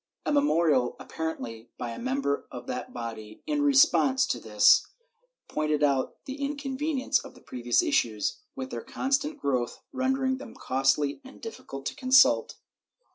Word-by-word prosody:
A 295 - +1
me 285 - +5
morial, 160 - +2
apparently 120 -8 -5
by 120 - -4
a - - -7
member 260 - -1
of 125 -2 -8
that 125 - -5
body, 110 -3 -7
in 300 -1 0
response 275 -1 +4
to - - -2
this, - - +5 0.6
pointed 150 -1 0
out 140 -2 +1
the 275 +2 -6
inconvenience 280 0 -1
of - - -11
the - - -15
previous 120 -1 0
issues, 110 -3 0 0.2
with 130 0 -6
their 120 - -4
constant 275 - -1
growth, 125 - -2
rendering 260 0 0
them 250 -3 -10
costly 135 - +1
and 265 +1 -13
difficult 135 - -8
to - - -3
consult. 260 -1 +4
165 Hz, 150 wpm, -28 LUFS, -, 0.6 s, me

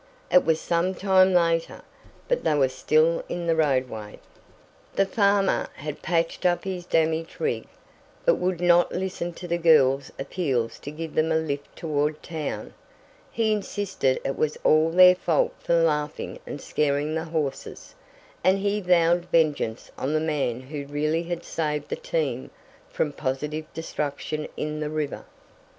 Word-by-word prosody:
It 180 - +6
was 160 -1 +2
some 175 +3 0
time 190 0 +4
later, 165 -2 +1 0.4
but - - 0
they 150 - +2
were 135 -3 +3
still 155 +5 +2
in 175 -1 -3
the 165 -1 +2
roadway. 130 -8 -1 0.8
The 195 - +3
farmer 200 -1 +2
had 150 +1 -6
patched 165 0 -1
up 175 -1 +2
his 180 -2 -5
damaged 160 0 0
rig, 460 -1 -1 0.6
but - - +4
would 180 -1 -1
not 175 0 +4
listen 180 -2 -3
to 175 - -8
the 170 0 -1
girls' 140 -5 +4
appeals 135 -6 -2
to - - -7
give 160 +1 -6
them 160 +1 +1
a - - +2
lift 145 -3 -4
toward 150 -1 -1
town. 160 -3 -5 0.6
He 225 -1 +1
insisted 200 -9 -1
it 135 - -1
was 155 -1 -1
all 155 +1 +4
their 180 +2 +8
fault 175 -3 +1
for 170 - +1
laughing 150 -2 0
and 145 - -6
scaring 145 +1 0
the 160 +1 -2
horses, 155 -4 -4 0.5
and 190 +1 +4
he 205 +1 0
vowed 175 -1 +3
vengeance 150 -9 0
on 140 +3 -1
the - - +3
man 145 -6 -1
who 140 +2 -6
really 155 +3 0
had 170 0 -4
saved 150 -2 -3
the - - -1
team - - -2 0.4
from 150 - -1
positive 150 +3 -3
destruction 150 -1 -4
in 150 0 -3
the 150 -1 -2
river. 150 -2 -3
160 Hz, 155 wpm, -25 LUFS, 150-175 Hz, 0.8 s, their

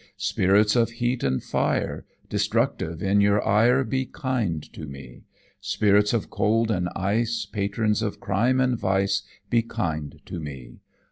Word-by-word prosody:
"Spirits 105 +4 +3
of 115 -1 +3
heat 120 +1 -1
and 65 0 0
fire, - - -1 0.2
Destructive 80 +1 -1
in 100 +1 +3
your 100 +1 +2
ire, 120 +6 +4
Be 130 +2 -2
kind 115 - -2
to 75 - -8
me. 70 -3 -11 0.3
"Spirits 105 -1 +2
of 115 -3 -2
cold 115 +2 +1
and 90 -3 0
ice, 115 +5 0
Patrons 105 +1 -1
of 105 -2 -3
crime 115 +7 +1
and 125 -2 +1
vice, 95 +1 +1 0.3
Be 115 - +4
kind 80 -11 -4
to 85 - -6
me. 65 -6 -9
105 Hz, 145 wpm, -25 LUFS, 95-115 Hz, 0.3 s, ire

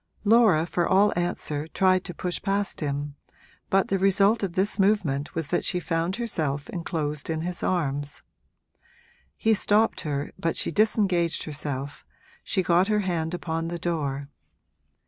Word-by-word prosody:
Laura, 210 -7 +5
for 175 0 0
all 200 +2 +4
answer, 160 -4 -2
tried 185 +2 +2
to 180 - -6
push 175 +1 -4
past 200 0 -1
him, 145 -1 -3 0.6
but 195 0 +2
the 195 - +1
result 195 +3 +4
of 195 -4 -2
this 195 +3 0
movement 185 -9 +1
was 160 -3 -2
that - - 0
she 180 - -1
found 165 +2 -1
herself 155 - -2
enclosed 155 -4 -3
in 160 -1 -1
his 175 +1 -4
arms. 145 -5 -1 1.1
He 220 - +3
stopped 215 +1 +2
her, 145 -2 -3
but 165 - -1
she - - 0
disengaged 190 -4 +2
herself, 145 -2 -5 0.4
she 190 - 0
got 175 +2 +3
her 210 -1 +2
hand 170 -3 -1
upon 165 -1 -3
the 170 +1 -3
door. 145 -5 -2
175 Hz, 150 wpm, -26 LUFS, 155-195 Hz, 1.1 s, Laura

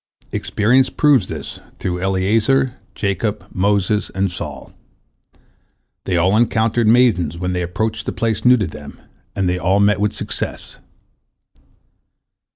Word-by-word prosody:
Experience 125 +5 +2
proves 140 -10 +3
this - - -7 0.2
through 90 -1 -3
Eliezer, 105 +7 +1 0.2
Jacob, 105 +1 -2
Moses, 100 +2 +1
and 95 -1 0
Saul. 85 - -7 1.3
They 90 -2 0
all 90 +4 +3
encountered 115 0 +2
maidens 110 -9 +3
when 90 +1 -2
they 90 - -1
approached 110 +5 -3
a - - 0
place 115 -2 -2
new 125 0 +6
to 105 - -1
them, 75 -3 -10 0.4
and 95 -2 0
they 90 0 0
all 95 +2 +2
met 100 -1 +3
with 105 0 +1
success. - - -5
100 Hz, 130 wpm, -19 LUFS, 90-115 Hz, 1.3 s, new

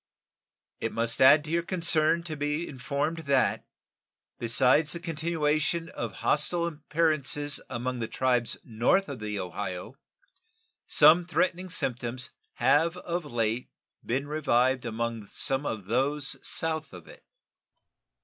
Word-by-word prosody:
It 115 - -2
must 115 +1 0
add 145 +3 +7
to 155 - -7
your 170 +1 +2
concern 170 -2 +2
to 160 -2 -5
be 150 +3 -2
informed 145 +4 -3
that, 135 -2 +2 0.7
besides 125 +6 +4
the 170 - -4
continuation 165 0 -1
of 115 -4 -6
hostile 170 +3 +2
appearances 150 -3 0
among 125 0 -3
the 115 - -2
tribes 125 -2 0
north 120 - +1
of 140 -4 -6
the 105 -1 -4
Ohio, 90 +2 -5 0.9
some 155 +4 +6
threatening 185 +1 0
symptoms 125 -5 -3 0.2
have 150 +8 +2
of 175 -2 -4
late 115 -2 -2 0.3
been 135 +4 -2
revived 130 -4 +1
among 115 -2 -3
some 135 +6 -1
of 105 -4 -4
those 135 +6 0
south 160 -5 -1
of 90 -3 -11
it. - - -15
145 Hz, 125 wpm, -28 LUFS, 120-160 Hz, 0.9 s, add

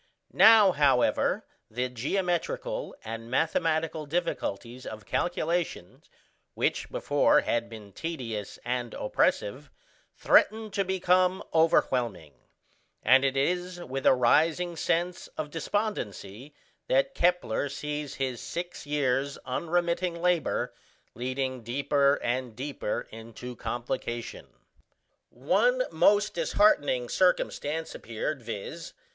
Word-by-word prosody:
Now, 215 -4 +8
however, 140 -6 +2 0.2
the 125 +3 -2
geometrical 195 - -2
and 115 +1 -6
mathematical 160 +2 0
difficulties 130 - -3
of 110 -2 -8
calculation, 170 - -2 0.5
which - - -1
before - - +3
had 115 0 -1
been 110 -3 -11
tedious 115 - -5
and 125 -1 -2
oppressive, - - 0 0.5
threatened 220 -1 +3
to 195 - +1
become 185 0 +2
overwhelming; 125 - +2 0.7
and 130 +1 +6
it 135 0 +1
is 180 +5 0
with 135 -5 -3
a - - +7
rising 160 +8 +2
sense 175 +2 -1
of 150 -1 -4
despondency 150 - -4 0.3
that - - +2
Kepler 175 -7 +1
sees 150 0 -5
his 130 -3 -3
six 175 -3 -6
years' 140 -1 0
unremitting 170 +4 -1
labour 175 -3 0 0.4
leading 130 +1 -3
deeper 140 +4 +2
and 120 -1 -2
deeper 135 -3 -4
into 115 +2 -9
complication. 120 0 -4 0.8
One 215 - +2
most 205 +6 +3
disheartening 150 -7 +2
circumstance 160 -2 0
appeared, 115 +5 -4
viz. 115 +9 -7
145 Hz, 100 wpm, -28 LUFS, 125-175 Hz, 0.8 s, Now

